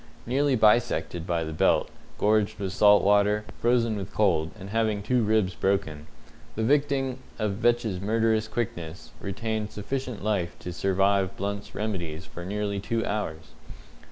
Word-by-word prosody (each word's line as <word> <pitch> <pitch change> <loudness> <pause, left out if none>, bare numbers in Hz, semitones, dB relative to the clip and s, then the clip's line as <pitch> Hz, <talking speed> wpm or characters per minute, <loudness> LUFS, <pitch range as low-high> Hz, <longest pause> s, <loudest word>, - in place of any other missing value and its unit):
Nearly 135 +3 +2
bisected 90 -7 +2
by 85 -2 0
the 80 0 -5
belt, 75 - +3 0.3
gorged 105 0 +2
with 100 -2 -3
salt 105 0 +6
water, 105 +1 +3
frozen 115 -2 +2
with 95 -4 -5
cold, 85 -7 +2
and 100 +1 -8
having 110 -2 0
two 125 +3 +2
ribs 105 -4 +2
broken, 85 -7 -1 0.5
the 110 - -1
victim 135 0 +1 0.2
of 105 -3 -1
Vetch's 115 -5 +1
murderous 110 +1 +1
quickness 85 -8 -5
retained 110 +2 -3
sufficient 125 +1 -4
life 100 -5 -1
to 90 - -7
survive 95 +1 +1
Blunt's 100 +1 -4
remedies 85 -6 -3
for 85 - -9
nearly 100 +1 -2
two 115 +3 -1
hours. 80 -7 -3
105 Hz, 145 wpm, -26 LUFS, 95-110 Hz, 0.5 s, salt